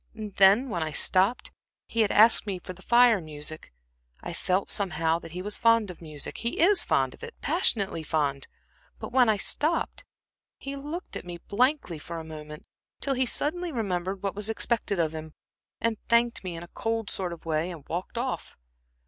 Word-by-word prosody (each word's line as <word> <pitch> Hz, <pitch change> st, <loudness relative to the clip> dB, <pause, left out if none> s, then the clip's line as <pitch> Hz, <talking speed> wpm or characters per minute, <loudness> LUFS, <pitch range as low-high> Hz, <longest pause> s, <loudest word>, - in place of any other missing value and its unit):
And 215 Hz, -2 st, -7 dB
then, 200 Hz, +7 st, +6 dB
when 175 Hz, -6 st, -2 dB
I 155 Hz, -1 st, -2 dB
stopped 195 Hz, -, +2 dB, 0.3 s
he 230 Hz, -, 0 dB
had 215 Hz, -, +2 dB
asked 220 Hz, 0 st, +6 dB
me 195 Hz, -2 st, -2 dB
for 180 Hz, +1 st, -8 dB
the 185 Hz, -, -16 dB
Fire 235 Hz, -1 st, +5 dB
music 155 Hz, 0 st, -5 dB, 0.5 s
I -, -, -5 dB
felt, 185 Hz, +2 st, 0 dB
somehow, 165 Hz, -4 st, 0 dB
that 165 Hz, -1 st, -11 dB
he 180 Hz, +1 st, -5 dB
was 210 Hz, +1 st, -1 dB
fond 230 Hz, -4 st, +4 dB
of 175 Hz, -, -14 dB
music 155 Hz, -3 st, -5 dB
he 235 Hz, -, -2 dB
is 370 Hz, +2 st, +6 dB
fond -, -, +1 dB
of -, -, -17 dB
it, 470 Hz, 0 st, -8 dB
passionately 205 Hz, -, +1 dB
fond 145 Hz, -3 st, -1 dB, 0.5 s
but -, -, -7 dB
when 250 Hz, -2 st, +5 dB
I 215 Hz, -, +3 dB
stopped, 315 Hz, +10 st, 0 dB, 0.5 s
he 275 Hz, 0 st, -6 dB
looked 300 Hz, +6 st, -6 dB
at -, -, -4 dB
me 175 Hz, -1 st, -7 dB
blankly 230 Hz, -, 0 dB
for 165 Hz, +2 st, -7 dB
a 165 Hz, -, -5 dB
moment, 150 Hz, -1 st, -9 dB, 0.3 s
till 275 Hz, -, +1 dB
he 260 Hz, -1 st, +1 dB
suddenly 345 Hz, +7 st, -1 dB
remembered 190 Hz, -, -2 dB
what 195 Hz, -, -1 dB
was 210 Hz, +1 st, -3 dB
expected 225 Hz, -2 st, 0 dB
of 160 Hz, -2 st, 0 dB
him, 155 Hz, -1 st, -8 dB, 0.4 s
and 230 Hz, -2 st, 0 dB
thanked 235 Hz, -1 st, +3 dB
me 180 Hz, -2 st, -4 dB
in 165 Hz, -, -7 dB
a -, -, -10 dB
cold 225 Hz, -2 st, -2 dB
sort 185 Hz, -2 st, -2 dB
of 170 Hz, -1 st, -9 dB
way 160 Hz, +1 st, 0 dB
and 165 Hz, -6 st, -9 dB
walked 180 Hz, +7 st, -4 dB
off. 255 Hz, +2 st, -3 dB
195 Hz, 195 wpm, -27 LUFS, 165-235 Hz, 0.5 s, then